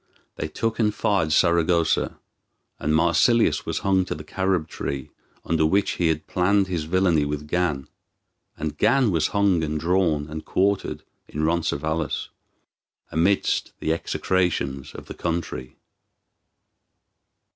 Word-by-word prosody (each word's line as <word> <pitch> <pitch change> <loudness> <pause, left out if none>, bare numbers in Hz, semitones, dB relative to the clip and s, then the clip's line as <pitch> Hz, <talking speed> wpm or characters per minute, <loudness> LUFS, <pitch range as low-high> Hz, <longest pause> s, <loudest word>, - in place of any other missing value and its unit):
They - - -3
took 115 +9 -2
and 105 -2 +3
fired 95 -6 0
Saragossa, 85 0 +2 0.6
and 75 +2 +1
Marsilius 110 +9 +3
was - - -1
hung 95 -1 +3
to - - -4
the 75 - -8
carob 95 -1 -1
tree 70 -3 -5 0.3
under 80 -1 +1
which 95 +6 +2
he 85 - 0
had 80 -1 -1
planned 100 +2 +2
his 90 -5 -3
villainy 85 -2 +2
with 75 +1 -3
Gan; 80 -5 -1 0.7
and 80 0 -4
Gan 120 +1 +3
was 80 -3 +2
hung 100 -5 +2
and 75 0 -2
drawn 85 -3 +1
and 80 0 -6
quartered 100 +1 0 0.2
in 75 - -4
Roncesvalles, 80 -1 -1 0.8
amidst 90 +6 +1
the 80 - 0
execrations 80 -6 -1
of - - -9
the - - -8
country. 80 -7 -4
85 Hz, 130 wpm, -24 LUFS, 75-95 Hz, 0.8 s, and